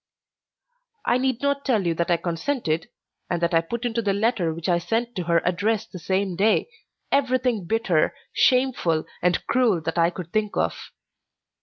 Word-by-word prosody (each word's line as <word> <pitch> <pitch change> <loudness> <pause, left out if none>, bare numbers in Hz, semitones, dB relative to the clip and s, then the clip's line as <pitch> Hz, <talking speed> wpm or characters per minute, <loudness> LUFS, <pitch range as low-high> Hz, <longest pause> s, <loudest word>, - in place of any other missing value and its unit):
I 245 - +3
need 260 -1 -1
not 280 0 +1
tell 225 -8 +1
you 170 - +2
that 170 +2 -1
I 170 - +4
consented, 170 - -2 0.4
and 175 - 0
that 170 +1 0
I 165 - +5
put 235 +8 -5
into 230 -1 0
the 200 -3 +1
letter 200 -5 +1
which 165 +2 -5
I 175 -2 +3
sent 235 +6 -2
to 180 - -2
her 170 0 +2
address 210 +5 0
the 190 -5 -10
same 190 +1 -1
day, 215 - +2 0.4
everything 255 -6 +1
bitter, 195 -7 +1 0.2
shameful, 250 -12 +2 0.2
and 180 0 +1
cruel 245 -8 +2
that 165 +2 -2
I 170 0 +4
could 175 -1 -8
think 215 -1 0
of. - - -2
200 Hz, 175 wpm, -24 LUFS, 170-240 Hz, 0.4 s, I